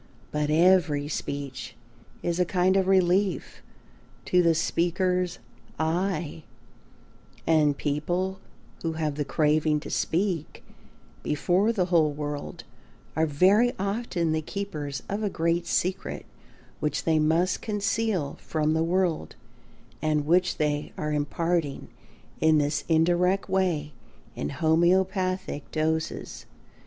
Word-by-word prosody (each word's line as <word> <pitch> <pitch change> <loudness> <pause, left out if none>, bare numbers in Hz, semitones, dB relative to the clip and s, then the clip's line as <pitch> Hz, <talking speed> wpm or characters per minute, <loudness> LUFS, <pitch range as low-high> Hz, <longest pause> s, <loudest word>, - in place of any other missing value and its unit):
But 150 0 -1
every 160 -3 +4
speech 140 -3 -5 0.5
is 175 0 -1
a - - +5
kind 180 +1 +2
of 190 -1 +2
relief 190 0 +2 0.6
to 180 - +4
the 165 -2 +3
speaker's 180 - 0 0.4
"I," 165 0 -1 1.0
and 150 -3 +3
people 175 +6 -1 0.4
who 165 -1 -2
have 155 -2 -1
the 145 +1 -2
craving 150 +1 +2
to - - -8
speak 170 -3 -1 0.6
before 180 +8 +1
the 195 -6 +1
whole 155 -3 +4
world 145 0 -5 0.5
are 160 +1 +2
very 195 +11 +4
often 195 -4 -1
the 155 0 0
keepers 150 -8 -5
of 200 +2 -3
a 210 - 0
great 170 0 0
secret 185 +1 -1 0.5
which 150 -1 -1
they 160 -1 +2
must 165 +4 +2
conceal 210 -6 -1
from 155 -1 0
the 160 0 +2
world 170 - 0 0.7
and 155 -2 +1
which 180 +3 +2
they 150 -1 -1
are 150 0 -2
imparting 150 +1 -1 0.5
in 160 -1 +4
this 145 0 0
indirect 175 +4 +2
way 180 -6 0 0.4
in 70 - -3
homœopathic 185 - +1
doses. 160 0 -2
165 Hz, 115 wpm, -26 LUFS, 150-185 Hz, 1.0 s, a